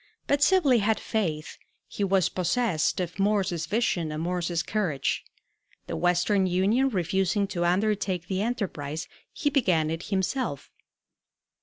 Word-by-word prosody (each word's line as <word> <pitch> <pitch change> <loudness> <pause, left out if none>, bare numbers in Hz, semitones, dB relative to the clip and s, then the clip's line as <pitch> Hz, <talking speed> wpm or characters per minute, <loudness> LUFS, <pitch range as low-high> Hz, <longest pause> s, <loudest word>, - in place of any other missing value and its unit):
But 285 0 +1
Sibley 290 -8 +4
had 215 +1 +1
faith; 160 -9 -3 0.3
he 205 - -4
was 190 -2 +3
possessed 185 -2 0
of 180 0 -4
Morse's 195 -5 +1
vision 175 -6 0
and 155 +1 -3
Morse's 175 -1 -1
courage. 175 -7 -1 0.6
The - - -4
Western 180 +2 +2
Union 200 +9 +2
refusing 190 -1 0
to 175 -3 -1
undertake 190 -1 0
the 190 0 -1
enterprise, 180 -10 -3 0.2
he 290 -4 -1
began 180 - +2
it 165 +1 -3
himself. 195 - -2
190 Hz, 130 wpm, -27 LUFS, 170-215 Hz, 0.6 s, Sibley